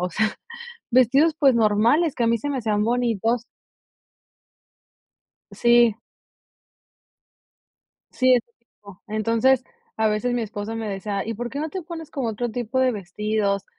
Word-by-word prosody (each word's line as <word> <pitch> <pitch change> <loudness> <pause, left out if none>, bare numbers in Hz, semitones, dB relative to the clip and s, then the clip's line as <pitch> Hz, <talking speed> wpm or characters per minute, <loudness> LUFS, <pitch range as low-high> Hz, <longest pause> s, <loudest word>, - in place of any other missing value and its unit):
o 180 - -1
sea, 215 +4 0 0.6
vestidos, 270 +6 +4
pues, 270 -4 +5
normales, 230 +9 +3
que 240 - -1
a - - +2
mí 230 0 +2
se 290 +6 -4
me 275 - -2
hacían 210 -3 0
bonitos. 235 -1 0 2.1
Sí. 235 -2 +4 2.2
Sí, 255 0 +4
ese 240 - 0 0.2
tipo, 200 -4 -17
entonces, 230 +4 +1 0.3
a 220 0 +1
veces 215 +4 -1
mi 240 - -1
esposo 215 +1 -5
me 225 -1 -4
decía: 200 +1 -3
"¿Y 225 - -2
por 240 +3 -5
qué 280 - -6
no 315 0 -3
te 375 -2 -5
pones 325 -2 -8
como 265 -5 -3
otro 230 +2 -3
tipo 240 +2 -3
de 260 -1 +3
vestidos?", 205 +1 -2
230 Hz, 150 wpm, -23 LUFS, 215-255 Hz, 2.2 s, pues